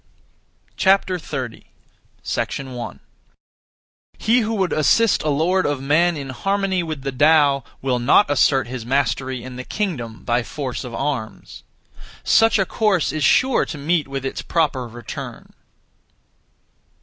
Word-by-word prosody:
30. 175 Hz, -, 0 dB, 0.7 s
1. 130 Hz, -3 st, -4 dB, 1.2 s
He 235 Hz, +3 st, +3 dB
who 225 Hz, -1 st, -1 dB
would 190 Hz, -4 st, 0 dB
assist 190 Hz, +9 st, +3 dB
a 155 Hz, -, -1 dB
lord 170 Hz, +6 st, +1 dB
of 145 Hz, -2 st, -1 dB
men 155 Hz, +5 st, +2 dB
in 140 Hz, -2 st, -6 dB
harmony 195 Hz, +6 st, -1 dB
with 155 Hz, -5 st, -5 dB
the 135 Hz, -, -2 dB
Tao 145 Hz, 0 st, +4 dB, 0.2 s
will 130 Hz, -2 st, 0 dB
not 130 Hz, +11 st, +4 dB
assert 135 Hz, -2 st, +3 dB
his 125 Hz, -1 st, -6 dB
mastery 130 Hz, 0 st, -1 dB
in 125 Hz, -1 st, -8 dB
the 130 Hz, -, -5 dB
kingdom 130 Hz, -, -4 dB
by 120 Hz, +1 st, +1 dB
force 130 Hz, +1 st, -5 dB
of 125 Hz, -2 st, -7 dB
arms. 135 Hz, -6 st, -4 dB, 0.6 s
Such 225 Hz, 0 st, +4 dB
a 195 Hz, -, +2 dB
course 200 Hz, -5 st, +1 dB
is 155 Hz, -2 st, -2 dB
sure 255 Hz, -, +4 dB
to 150 Hz, -, -7 dB
meet 155 Hz, +1 st, 0 dB
with 135 Hz, -1 st, -5 dB
its 135 Hz, -, -3 dB
proper 145 Hz, -7 st, 0 dB
return. 120 Hz, 0 st, -9 dB
145 Hz, 135 wpm, -21 LUFS, 130-180 Hz, 1.2 s, Tao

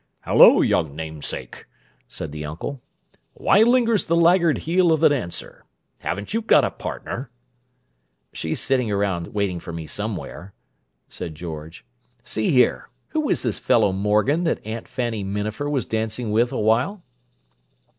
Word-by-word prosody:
"Hello, -, -, +7 dB
young 70 Hz, -3 st, +1 dB
namesake," 80 Hz, -1 st, -6 dB, 0.4 s
said 80 Hz, -, -7 dB
the 75 Hz, 0 st, -6 dB
uncle. 80 Hz, -, -6 dB, 0.5 s
"Why 205 Hz, -, +4 dB
lingers 230 Hz, -2 st, +3 dB
the 170 Hz, -, +1 dB
laggard 170 Hz, -1 st, +4 dB
heel 175 Hz, +1 st, +2 dB
of 160 Hz, -, +3 dB
the 160 Hz, -, +6 dB
dancer? 125 Hz, -12 st, -3 dB, 0.4 s
Haven't 100 Hz, -, -4 dB
you 225 Hz, -, +1 dB
got 225 Hz, -, +4 dB
a -, -, 0 dB
partner?" 125 Hz, 0 st, -6 dB, 1.0 s
"She's 80 Hz, -1 st, -3 dB
sitting 130 Hz, -4 st, 0 dB
around 100 Hz, -4 st, -1 dB
waiting 100 Hz, -4 st, -2 dB
for 85 Hz, -, -8 dB
me 85 Hz, -1 st, -6 dB
somewhere," 100 Hz, 0 st, -6 dB, 0.5 s
said 80 Hz, -3 st, -7 dB
George. 80 Hz, 0 st, -8 dB, 0.4 s
"See 110 Hz, -, -1 dB
here: 125 Hz, -2 st, +2 dB, 0.2 s
Who 310 Hz, -2 st, -1 dB
is -, -, 0 dB
this 120 Hz, -5 st, -2 dB
fellow 110 Hz, -4 st, +3 dB
Morgan 105 Hz, -, +1 dB
that 160 Hz, -, -1 dB
Aunt 110 Hz, +1 st, -5 dB
Fanny 120 Hz, -5 st, -3 dB
Minafer 105 Hz, +8 st, -3 dB
was 140 Hz, -4 st, -1 dB
dancing 110 Hz, +1 st, -2 dB
with 115 Hz, +3 st, +2 dB
a -, -, -3 dB
while?" 120 Hz, -, +1 dB
110 Hz, 145 wpm, -23 LUFS, 95-145 Hz, 1.0 s, Hello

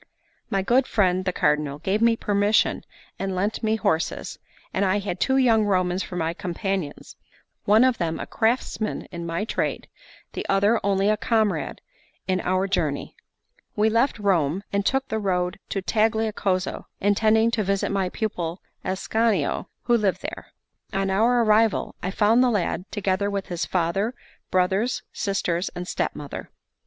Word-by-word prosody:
My 195 Hz, -1 st, 0 dB
good 250 Hz, +6 st, +3 dB
friend 185 Hz, -3 st, +2 dB
the 185 Hz, -, +1 dB
Cardinal 150 Hz, -3 st, +1 dB
gave 190 Hz, +7 st, -1 dB
me 230 Hz, 0 st, +5 dB
permission 205 Hz, 0 st, +2 dB, 0.4 s
and 195 Hz, -1 st, -2 dB
lent 200 Hz, +4 st, -1 dB
me 220 Hz, -1 st, +1 dB
horses; 170 Hz, -7 st, -1 dB, 0.3 s
and 195 Hz, -, +1 dB
I 195 Hz, +1 st, +2 dB
had 195 Hz, -3 st, -3 dB
two 265 Hz, 0 st, +2 dB
young 230 Hz, -4 st, +4 dB
Romans 185 Hz, -2 st, +1 dB
for 180 Hz, -, -6 dB
my 165 Hz, -1 st, -1 dB
companions, 180 Hz, -2 st, -4 dB, 0.5 s
one 215 Hz, +4 st, +6 dB
of 255 Hz, -2 st, +2 dB
them 165 Hz, -2 st, -1 dB
a -, -, -4 dB
craftsman 225 Hz, -1 st, -1 dB
in 170 Hz, -1 st, -5 dB
my 165 Hz, +5 st, -2 dB
trade, -, -, -2 dB, 0.5 s
the -, -, -3 dB
other 200 Hz, +4 st, +3 dB
only 195 Hz, 0 st, +2 dB
a 215 Hz, 0 st, +3 dB
comrade 220 Hz, -2 st, 0 dB, 0.5 s
in 185 Hz, -1 st, +1 dB
our 185 Hz, +1 st, +1 dB
journey. 155 Hz, -7 st, -1 dB, 0.6 s
We 220 Hz, +1 st, +3 dB
left 235 Hz, +4 st, +2 dB
Rome, 190 Hz, -4 st, +1 dB
and 200 Hz, 0 st, +1 dB
took 270 Hz, +5 st, +1 dB
the 220 Hz, -, -2 dB
road 180 Hz, -2 st, -1 dB
to 195 Hz, -, -2 dB
Tagliacozzo, 215 Hz, -4 st, 0 dB
intending 220 Hz, +3 st, +3 dB
to 225 Hz, -2 st, 0 dB
visit 195 Hz, +1 st, 0 dB
my 195 Hz, -2 st, 0 dB
pupil 180 Hz, -5 st, -3 dB, 0.2 s
Ascanio, 195 Hz, -2 st, 0 dB, 0.2 s
who 240 Hz, -, +3 dB
lived 205 Hz, -5 st, 0 dB
there. -, -, -6 dB, 0.5 s
On 195 Hz, 0 st, 0 dB
our 235 Hz, +5 st, +3 dB
arrival, 220 Hz, 0 st, +3 dB
I 180 Hz, -, -2 dB
found 215 Hz, +5 st, +4 dB
the 255 Hz, -, +4 dB
lad, 185 Hz, -4 st, -1 dB
together 200 Hz, -1 st, 0 dB
with 200 Hz, -1 st, -3 dB
his 175 Hz, -1 st, -2 dB
father, 190 Hz, +7 st, 0 dB, 0.3 s
brothers, 190 Hz, +6 st, +1 dB
sisters, 185 Hz, -2 st, -1 dB
and 180 Hz, 0 st, -5 dB
stepmother. 145 Hz, -5 st, -4 dB
200 Hz, 155 wpm, -24 LUFS, 185-220 Hz, 0.6 s, one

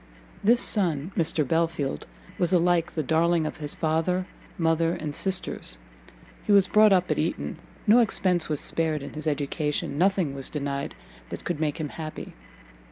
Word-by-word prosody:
This 235 Hz, +4 st, +4 dB
son, 170 Hz, -5 st, 0 dB
Mr 155 Hz, -4 st, +1 dB
Belfield, 160 Hz, -, -1 dB, 0.3 s
was 175 Hz, -, +1 dB
alike 175 Hz, -2 st, +2 dB
the 155 Hz, -, -1 dB
darling 165 Hz, +3 st, +2 dB
of -, -, -4 dB
his 150 Hz, -2 st, -5 dB
father, 165 Hz, +3 st, 0 dB, 0.3 s
mother, 165 Hz, 0 st, +1 dB
and 150 Hz, -2 st, -5 dB
sisters: 185 Hz, -, +1 dB, 0.7 s
he -, -, -1 dB
was 200 Hz, -2 st, +6 dB
brought 215 Hz, +1 st, +5 dB
up 185 Hz, -1 st, +3 dB
at -, -, 0 dB
Eton, -, -, -2 dB, 0.3 s
no 225 Hz, +2 st, +6 dB
expence 185 Hz, -7 st, +2 dB
was 150 Hz, -2 st, -1 dB
spared 155 Hz, -3 st, 0 dB
in 140 Hz, -, -8 dB
his 155 Hz, 0 st, -4 dB
education, 150 Hz, 0 st, -2 dB
nothing 185 Hz, -5 st, +2 dB
was 135 Hz, -1 st, -4 dB
denied 140 Hz, -2 st, -4 dB, 0.3 s
that -, -, -7 dB
could 170 Hz, -4 st, -3 dB
make 150 Hz, -1 st, -1 dB
him 155 Hz, -2 st, -3 dB
happy. 155 Hz, 0 st, -7 dB
165 Hz, 165 wpm, -26 LUFS, 150-180 Hz, 0.7 s, was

